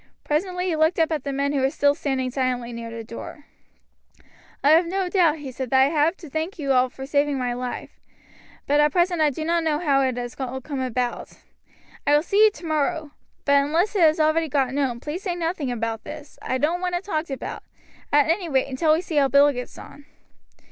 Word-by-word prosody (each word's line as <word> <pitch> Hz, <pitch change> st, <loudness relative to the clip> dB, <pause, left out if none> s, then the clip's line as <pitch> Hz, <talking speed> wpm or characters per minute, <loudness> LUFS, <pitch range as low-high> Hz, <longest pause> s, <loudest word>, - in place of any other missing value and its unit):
Presently 360 Hz, +4 st, -1 dB
he 350 Hz, -3 st, 0 dB
looked 315 Hz, +2 st, +2 dB
up 325 Hz, -1 st, +2 dB
at 300 Hz, -4 st, -2 dB
the 280 Hz, -, -2 dB
men 280 Hz, +1 st, -1 dB
who 280 Hz, -, +1 dB
were 265 Hz, -, +3 dB
still 285 Hz, 0 st, +2 dB
standing 265 Hz, -4 st, -2 dB
silently 250 Hz, -2 st, -2 dB
near 230 Hz, 0 st, -6 dB
the 230 Hz, 0 st, -7 dB
door. 235 Hz, +5 st, -9 dB, 1.2 s
"I 285 Hz, -, +5 dB
have 335 Hz, +2 st, +5 dB
no 375 Hz, +1 st, -1 dB
doubt," 340 Hz, -5 st, +3 dB
he 285 Hz, -3 st, -7 dB
said, 255 Hz, 0 st, -5 dB
"that 265 Hz, -, +4 dB
I 265 Hz, +1 st, +5 dB
have 320 Hz, +3 st, +1 dB
to 330 Hz, -, -11 dB
thank 315 Hz, +7 st, -4 dB
you 280 Hz, -4 st, -1 dB
all 255 Hz, 0 st, +3 dB
for 265 Hz, +1 st, -8 dB
saving 285 Hz, 0 st, +1 dB
my 250 Hz, -2 st, -1 dB
life, 250 Hz, 0 st, -6 dB, 0.7 s
but 290 Hz, +1 st, +2 dB
at 295 Hz, 0 st, +4 dB
present 350 Hz, 0 st, +1 dB
I 305 Hz, -, +4 dB
do 310 Hz, +3 st, -5 dB
not 335 Hz, 0 st, +1 dB
know 310 Hz, -2 st, +1 dB
how 285 Hz, -4 st, +2 dB
it 260 Hz, -2 st, 0 dB
has 245 Hz, 0 st, -5 dB
all 260 Hz, 0 st, -3 dB
come 275 Hz, +1 st, -5 dB
about. 250 Hz, -1 st, -3 dB, 0.7 s
I 290 Hz, -, +5 dB
will 295 Hz, -, +3 dB
see 405 Hz, +4 st, +4 dB
you -, -, +6 dB
tomorrow. 315 Hz, -4 st, -2 dB, 0.3 s
But 280 Hz, 0 st, +4 dB
unless 340 Hz, +9 st, 0 dB
it 390 Hz, -, +2 dB
has 315 Hz, 0 st, +5 dB
already 315 Hz, +1 st, +2 dB
got 265 Hz, -2 st, 0 dB
known, 270 Hz, -4 st, -1 dB
please 300 Hz, +6 st, -5 dB
say 365 Hz, -4 st, -2 dB
nothing 330 Hz, -6 st, -2 dB
about 225 Hz, -2 st, -3 dB
this. 300 Hz, -1 st, -10 dB
I 260 Hz, -, -1 dB
don't 325 Hz, +6 st, 0 dB
want 360 Hz, -1 st, -1 dB
it 350 Hz, -, -3 dB
talked 320 Hz, -5 st, -3 dB
about 270 Hz, -, -5 dB, 0.5 s
at 290 Hz, 0 st, +4 dB
any 335 Hz, +1 st, 0 dB
rate 270 Hz, -1 st, +1 dB
until 310 Hz, +4 st, +2 dB
we 320 Hz, -, +1 dB
see 335 Hz, -4 st, -4 dB
how 280 Hz, -1 st, +5 dB
Bill 280 Hz, +1 st, +5 dB
gets 250 Hz, -2 st, -7 dB
on. 285 Hz, -, -12 dB
290 Hz, 225 wpm, -23 LUFS, 265-330 Hz, 1.2 s, you